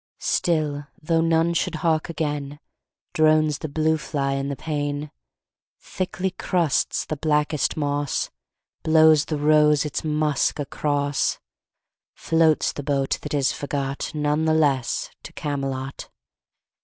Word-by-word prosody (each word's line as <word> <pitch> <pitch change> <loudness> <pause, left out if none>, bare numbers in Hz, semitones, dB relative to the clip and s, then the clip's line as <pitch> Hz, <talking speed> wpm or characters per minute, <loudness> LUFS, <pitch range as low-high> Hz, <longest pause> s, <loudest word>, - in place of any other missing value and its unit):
Still, 150 -4 0
though 165 +1 +1
none 165 +1 +2
should 170 0 -1
hark 160 0 +1
again, 145 -3 -3 0.5
Drones 155 -1 +3
the 155 - -5
blue 160 +2 +1
fly 140 -3 -2
in 135 0 -2
the 140 - -3
pane, 145 0 -3 0.7
Thickly 185 +1 -3
crusts 175 -5 0
the 155 - -3
blackest 150 -1 0
moss, 145 -2 -1 0.5
Blows 155 -1 +5
the 155 - -2
rose 150 0 +4
its 150 - -3
musk 150 -2 +1
across, 145 -1 -1 0.8
Floats 160 -1 +2
the - - -5
boat 140 -1 0
that 150 0 -4
is 140 -2 +2
forgot 140 -1 -3
None 150 +1 +1
the 160 0 +3
less 140 -5 +1
to - - -11
Camelot. 135 -2 -4
150 Hz, 125 wpm, -23 LUFS, 145-155 Hz, 0.8 s, Blows